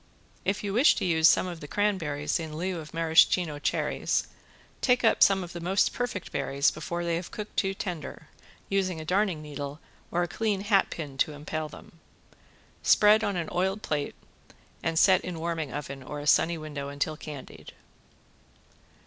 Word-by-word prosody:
If 195 +2 0
you 200 -1 -2
wish 250 +8 +5
to - - -2
use 160 -2 +5
some - - +4
of 175 -2 -6
the 150 - -8
cranberries 165 -8 0
in 155 -2 -6
lieu 180 +1 -2
of 150 -1 -9
Maraschino 165 -1 +3
cherries, - - 0 0.6
take 250 -1 +3
up 225 - +3
some 195 -1 +5
of 175 - -9
the 175 - -5
most 185 +4 +1
perfect 245 -7 -3
berries 140 +1 +1
before 175 0 -4
they 170 -1 0
have 170 - -6
cooked 210 -1 -7
too 195 -1 0
tender, 175 -5 -6 0.4
using 185 -4 0
a 155 - -7
darning 185 -3 +1
needle 145 0 -6 0.3
or 175 +1 +1
clean 205 +3 -1
hat 200 -1 +3
pin 145 -5 -7
to 155 - +2
impale 155 +1 -4
them. 165 - -14 0.8
Spread 210 +1 +5
on 200 - 0
an 170 -2 -2
oiled 190 +4 -1
plate 145 -2 -2 0.7
and 165 0 -1
set 190 +1 +6
in 180 -2 -5
warming 165 -4 -3
oven 140 0 -6
or 145 +3 -6
a 145 - -7
sunny 165 +3 +4
window 145 -3 -6
until 145 +2 -2
candied. 150 -3 -10
170 Hz, 175 wpm, -28 LUFS, 150-195 Hz, 0.8 s, set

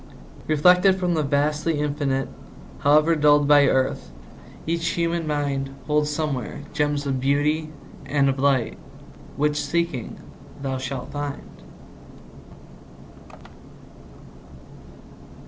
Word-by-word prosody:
Reflected 180 +5 +5
from 180 -2 -1
the 160 - +1
vastly 150 +2 0
Infinite, 145 -3 -1 0.5
However 155 +3 +4
dulled 145 -1 +4
by 145 -1 +6
earth, 130 0 0 0.6
each 165 +1 -1
human 170 -1 -1
mind 140 -2 -1 0.2
Holds 150 0 +1
somewhere 145 -4 -3
gems 145 -1 0
of 135 -2 -1
beauty 150 +3 0 0.4
and 140 -1 +2
of 135 0 0
light 135 -4 +1 0.6
Which, 150 +1 +1
seeking, 170 -8 -2 0.4
thou 135 -1 -3
shalt 130 -1 -5
find. 145 -1 -5
145 Hz, 95 wpm, -23 LUFS, 140-155 Hz, 0.6 s, by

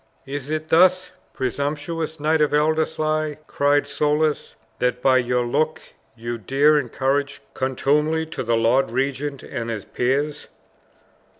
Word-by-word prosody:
"Is 140 0 -6
it 155 0 -3
thus, 185 +2 +4 0.2
presumptuous 150 +5 -3
Knight 155 +1 +2
of 150 -1 +2
Ellerslie," 155 0 0
cried 145 0 +2
Soulis, 150 +1 0 0.2
"that 125 0 0
by 130 +1 +4
your 125 0 0
looks 155 +6 -2 0.2
you 120 0 -5
dare 145 +7 +3
encourage 140 +2 -1
contumely 150 +5 +1
to 160 - -6
the 115 -1 +1
lord 115 +3 +2
regent 135 +2 -2
and 115 0 -5
his 110 -4 -4
peers?" 145 +4 -1
145 Hz, 125 wpm, -22 LUFS, 130-155 Hz, 0.2 s, thus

